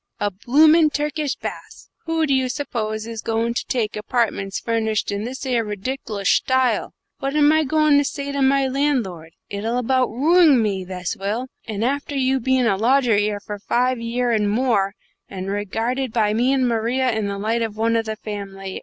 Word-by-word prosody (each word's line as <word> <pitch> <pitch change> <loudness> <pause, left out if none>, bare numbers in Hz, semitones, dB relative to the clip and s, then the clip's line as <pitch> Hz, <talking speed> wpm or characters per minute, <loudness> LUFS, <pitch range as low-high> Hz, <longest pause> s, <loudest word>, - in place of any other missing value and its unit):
A 205 0 0
bloomin' 305 - +4
Turkish 295 -1 -2
baths! - - -8 0.2
Who 325 -1 +1
do 280 - +1
you 260 -1 +1
suppose 220 -6 -3
is 225 -1 -6
goin' 230 +1 -1
to - - -2
take 225 -4 -1
apartments 210 -3 -1
furnished 220 -3 -1
in 200 +1 -3
this 260 +2 -6
'ere 245 -3 +1
ridic'loush 210 -1 -1
style? 260 -1 0 0.2
What 275 +2 -3
am 295 0 +5
I 315 0 +3
goin' 305 0 +4
to - - +2
say 280 0 -4
to 280 0 -2
my 270 0 +3
landlord? 245 - -1
It'll 220 +4 -2
about 255 +1 +1
ruing 300 +3 +4
me, 200 -4 0
this 180 +1 -4
will; 220 +5 -3 0.2
and 220 0 -2
after 285 +2 -2
you 265 0 +1
bein' 260 0 +1
a 200 -4 +2
lodger 245 +1 +3
'ere 205 0 0
for 205 0 -7
five 250 +4 0
year 240 +1 -1
and 210 -2 +1
more, 210 -3 +1 0.3
and 190 0 -5
regarded 225 +6 -2
by 215 -2 +1
me 245 +4 +2
and 265 -2 +2
Maria 240 +3 +1
in 220 -2 -1
the 200 0 -3
light 220 +3 -1
of 220 -2 -3
one 230 +1 +1
of 225 -1 +1
the 220 - -3
family. 195 -3 -7
235 Hz, 190 wpm, -21 LUFS, 210-265 Hz, 0.3 s, am